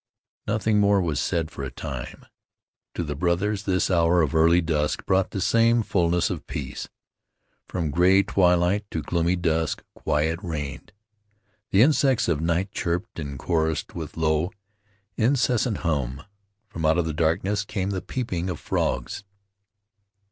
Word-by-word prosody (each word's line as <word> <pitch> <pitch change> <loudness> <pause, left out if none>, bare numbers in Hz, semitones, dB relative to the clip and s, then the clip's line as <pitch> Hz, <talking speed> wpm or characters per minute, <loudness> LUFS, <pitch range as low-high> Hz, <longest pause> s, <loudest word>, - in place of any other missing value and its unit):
Nothing 105 0 +1
more 100 0 +4
was 80 -6 -1
said 85 -3 -1
for 70 - -7
a 70 - -3
time. 65 -1 -7 0.7
To 85 - -1
the 75 -2 -3
brothers 95 +5 0
this 95 0 +1
hour 85 0 +4
of 75 - -1
early 85 +2 +5
dusk 75 -3 -1
brought 95 0 +2
the 100 - -4
same 115 +5 +3
fullness 90 -3 +1
of - - -6
peace. 65 -3 -5 0.8
From 85 -5 -2
gray 90 +5 +5
twilight 95 +1 +2
to 80 - -3
gloomy 85 +3 +1
dusk 80 -2 -1
quiet 80 +3 0
reigned. 75 0 -5 0.8
The 100 +4 +5
insects 135 -3 +3
of 80 -3 0
night 85 +4 0
chirped 85 +4 -3
and 70 -3 -5
chorused 80 +2 -1
with 80 -2 -7
low, 80 +2 +1 0.7
incessant 125 -2 +2
hum. 70 -3 -1 0.4
From 85 -7 -7
out 80 +2 +3
the 80 - -2
darkness 90 +6 0
came 100 -1 -3
the 95 -2 -2
peeping 95 -8 -3
of 90 - -4
frogs. - - -2
85 Hz, 145 wpm, -25 LUFS, 80-100 Hz, 0.8 s, early